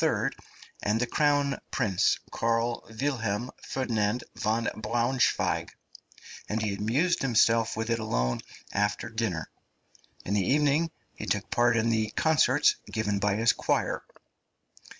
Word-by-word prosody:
and 105 +2 +1
the 125 - +2
Crown 145 +1 +1
Prince 100 -4 +2
Karl 115 +1 0
Wilhelm 120 -4 -1
Ferdinand 115 -3 -1
von 110 +2 0
Braunschweig, 120 +3 +1 0.8
and 110 - 0
he 110 -2 -1
amused 130 - +1
himself 115 -3 +3
with 110 +1 -2
it 115 - +1
alone 60 - -1 0.3
after 105 +2 0
dinner; 110 -8 -2 0.8
in 100 - -1
the 105 - +3
evening 150 - +2 0.2
he - - -7
took - - -1
part 120 -1 +3
in 115 +1 +2
the 110 -1 +1
concerts 150 -3 +3
given 105 -3 -1
by 100 0 +1
his 115 +2 +3
choir. - - -1
115 Hz, 125 wpm, -28 LUFS, 105-125 Hz, 0.8 s, himself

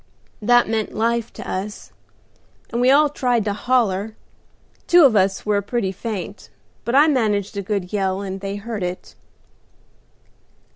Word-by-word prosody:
That 240 +3 +4
meant 220 -1 -2
life 230 +1 0
to - - -9
us, 200 +3 -5 0.8
and 235 - -1
we 250 - +4
all 295 +3 +6
tried 245 -6 0
to 205 - 0
holler; 220 -3 0 0.7
two 350 -3 +7
of 250 -5 +4
us 195 -1 +1
were 205 -1 +1
pretty 205 -2 -2
faint, 200 0 -6 0.4
but 235 - -1
I 290 +2 +7
managed 215 -8 0
a 200 - -2
good 195 -1 -3
yell, 195 -1 0
and 190 -1 -5
they 195 0 -4
heard 215 0 -5
it. 180 0 -5
210 Hz, 150 wpm, -21 LUFS, 195-240 Hz, 0.8 s, two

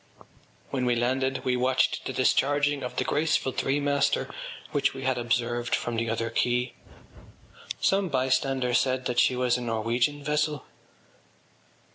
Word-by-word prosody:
When 130 -2 -1
we 120 - +3
landed 130 +2 0
we 125 - +2
watched 125 +1 +1
the - - -3
discharging 145 +1 +2
of 125 -1 -5
the - - 0
graceful 150 -3 +1
threemaster 140 +2 0 0.4
which 145 -1 +1
we 135 - -6
had 130 -1 0
observed 120 0 0
from 120 - -3
the 115 0 -1
other 115 0 -2
quay. 125 +2 0 1.1
Some 195 -1 +2
bystander 130 -1 +1
said 130 0 +1
that 125 -1 0
she 125 - +4
was 125 -1 +1
a - - -6
Norwegian 120 +5 0
vessel. 150 -1 -1
130 Hz, 140 wpm, -27 LUFS, 120-140 Hz, 1.1 s, she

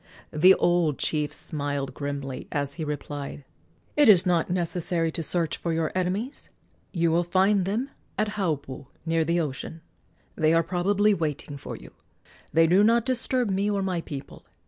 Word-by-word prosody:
The 180 +5 +7
old 175 -5 +2
chief 150 -2 0
smiled 145 -3 -4
grimly 140 -2 -5
as 140 -1 -2
he 160 - -5
replied: 145 -1 -5 0.5
"It 295 -5 +6
is 185 -3 +7
not 175 -3 +2
necessary 175 -1 -1
to 165 - -3
search 165 0 -1
for 170 - -3
your 160 -1 0
enemies. 190 +9 -2 0.4
You 170 -3 +1
will 170 +2 +3
find 190 +2 +2
them 230 +8 -2 0.3
at 215 0 +1
Haupu, 155 -10 -3 0.2
near 165 0 +2
the 170 +2 +1
ocean. 160 +1 -4 0.5
They 155 +1 +3
are 165 - +4
probably 200 +5 +2
waiting 150 -4 -3
for 140 - -7
you. - - -12 0.6
They 165 0 +5
do 180 +5 +5
not 230 +1 +4
disturb 255 -3 0
me 195 +2 +1
or 200 -1 0
my 185 -3 -1
people. 140 -3 -8
170 Hz, 165 wpm, -26 LUFS, 150-195 Hz, 0.6 s, The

